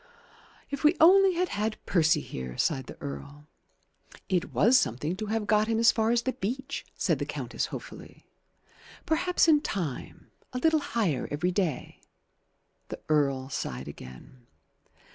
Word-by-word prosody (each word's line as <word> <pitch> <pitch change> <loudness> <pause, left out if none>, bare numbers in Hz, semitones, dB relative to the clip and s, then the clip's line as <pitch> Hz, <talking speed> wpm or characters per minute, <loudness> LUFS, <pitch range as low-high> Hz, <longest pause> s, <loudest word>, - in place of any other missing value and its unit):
"If 280 +1 -4
we 305 +4 +4
only 380 +3 +6
had 360 +1 0
had 215 +1 -2
Percy 160 -3 +3
here!" 65 -1 -7
sighed 135 -6 0
the - - -10
Earl. 145 +1 -8 0.8
"It 180 -2 0
was 235 +5 +4
something 150 - +1
to 215 +1 -4
have 220 0 -1
got 215 +1 +2
him 225 -1 0
as 230 +1 +6
far 220 -2 0
as 235 0 +2
the 260 - -1
beach," 265 +7 -4
said - - 0
the - - -2
Countess - - -3
hopefully. - - -10 0.8
"Perhaps 345 +2 +2
in 300 -2 +5
time 170 - -5 0.2
a - - -2
little 320 +4 +3
higher 215 - -1
every 155 +5 -1
day 180 -7 -2 0.5
" - - -46
The - - -6
Earl 140 -3 +1
sighed - - -4
again. 65 - -12
210 Hz, 155 wpm, -28 LUFS, -, 0.8 s, only